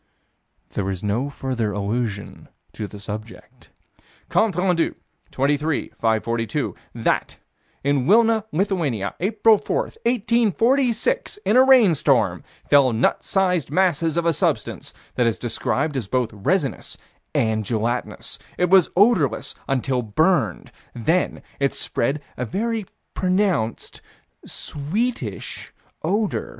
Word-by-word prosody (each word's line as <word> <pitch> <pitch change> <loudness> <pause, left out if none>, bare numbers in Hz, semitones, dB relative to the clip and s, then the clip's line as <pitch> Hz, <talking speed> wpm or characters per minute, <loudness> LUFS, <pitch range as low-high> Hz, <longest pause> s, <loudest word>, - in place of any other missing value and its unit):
There 95 -1 -2
is 95 -1 -4
no 115 +7 0
further 130 -6 -2
allusion 105 +1 -3 0.3
to 105 - -5
this 100 0 -10
subject. 110 +2 -9 0.6
Comptes 210 -6 +2
Rendus, 180 -2 +1 0.3
23 145 +3 0
542: 115 0 -1 0.2
That, - - 0 0.5
in 140 -2 +1
Wilna, 225 0 +4
Lithuania, 155 - -1
April 215 +2 +4
4, - - -2 0.3
1846, 240 - +1
in 215 - +3
a 255 - +8
rainstorm, 150 - +4 0.3
fell 140 -3 +5
nut 110 - +1
sized 180 -6 +1
masses 165 -1 +1
of 170 - +1
a 170 - +3
substance - - -1 0.2
that 120 -2 +2
is 115 - 0
described 140 +5 -1
as 125 -7 -2
both 125 -1 0
resinous 140 - -1 0.4
and 110 -1 +1
gelatinous. 115 +3 -2 0.2
It 180 0 +1
was 190 -3 +6
odorless 180 - +3
until 130 -1 0
burned: 120 - +1 0.2
then 160 +10 0 0.2
it 140 -1 +1
spread 140 +5 -1
a 125 - -2
very 220 - -2 0.3
pronounced 185 - 0 0.5
sweetish 150 - -3 0.3
odor. 205 +5 -1
145 Hz, 115 wpm, -22 LUFS, 115-195 Hz, 0.6 s, a